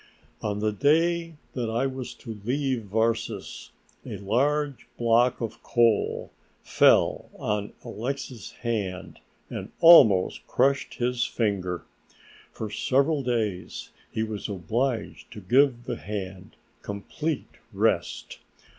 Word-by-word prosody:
On 105 -1 -2
the 110 0 +1
day 165 - +2 0.2
that 120 -3 -2
I 115 +4 0
was 130 -2 -5
to 110 -5 -9
leave 130 -1 -1
Varses 110 +3 -2 0.3
a 105 - -6
large 140 +8 0
block 120 +1 +3
of 115 - -5
coal 115 -3 +1 0.3
fell - - +3
on 105 -1 -2
Alexix's 120 -1 -5
hand 100 -6 -3 0.3
and - - -6
almost 115 - +7
crushed 135 0 +1
his 120 0 0
finger. 95 -6 -1 0.7
For 110 -2 -6
several 140 +6 +2
days 110 -8 -2 0.2
he 110 - -1
was 110 -1 -4
obliged 110 +6 -2
to - - -8
give 130 -1 +3
the 120 -1 -4
hand 95 -2 -6 0.3
complete 135 +9 -4
rest. - - -1
115 Hz, 110 wpm, -26 LUFS, 105-135 Hz, 0.7 s, almost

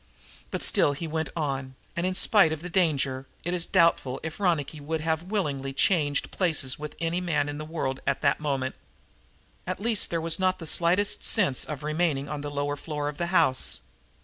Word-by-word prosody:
But - - -3
still 145 - +5
he 160 +4 -5
went 160 0 -2
on, 135 -4 -3 0.2
and, 170 +2 0
in 185 - -1
spite 195 -4 +5
of 160 0 -4
the 180 - -6
danger, 140 -7 +1 0.2
it 175 - -2
is 175 -1 -1
doubtful 165 -7 +3
if 160 +2 -6
Ronicky 160 -6 0
would 155 +2 -3
have 160 0 0
willingly 150 -9 -2
changed 145 -2 +1
places 155 -8 -1
with 150 0 -6
any 170 +2 -1
man 150 -5 0
in 145 0 -4
the 155 - -5
world 145 -4 -3
at 140 - 0
that - - +3
moment. 135 -3 -1 0.9
At - - -2
least 225 0 +1
there 170 - -1
was 165 +1 +1
not 185 0 +2
the 165 - -8
slightest 180 +6 +2
sense 180 - +3
in 150 - -4
remaining 150 -1 -1
on 150 0 -4
the 145 - -4
lower 145 0 -2
floor 150 -1 -3
of 145 - -9
the 170 - 0
house. 165 -8 +2
155 Hz, 200 wpm, -27 LUFS, 145-175 Hz, 0.9 s, still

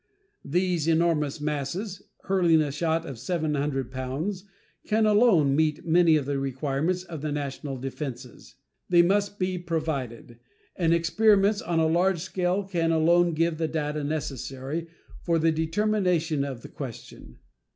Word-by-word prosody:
These 175 0 0
enormous 160 -3 +1
masses, 150 +7 -3 0.2
hurling 175 -4 +3
a 150 -2 0
shot 160 +2 -1
of 130 -5 -7
700 145 -4 -2
pounds, 145 +10 -4 0.4
can 220 +1 +2
alone 205 - +4
meet 155 0 0
many 165 -1 +5
of 150 -3 0
the 140 0 -1
requirements 140 +6 -1
of 165 -5 -8
the 155 0 -3
national 140 -1 -4
defenses. 130 -1 -7 0.3
They 175 -1 +6
must 200 +3 +1
be 185 -1 -1
provided, 145 -9 -4 0.4
and 165 -3 +1
experiments 200 +4 +3
on 170 -1 -2
a 160 - +3
large 175 +3 +2
scale 185 +1 -1
can 170 -4 0
alone 170 +1 +3
give 165 0 0
the 160 - 0
data 150 -1 -2
necessary 145 +1 -4 0.3
for 170 -1 +1
the 165 0 +3
determination 165 -2 0
of 135 -4 -6
the - - -9
question. 115 - -9
160 Hz, 140 wpm, -26 LUFS, 140-180 Hz, 0.4 s, They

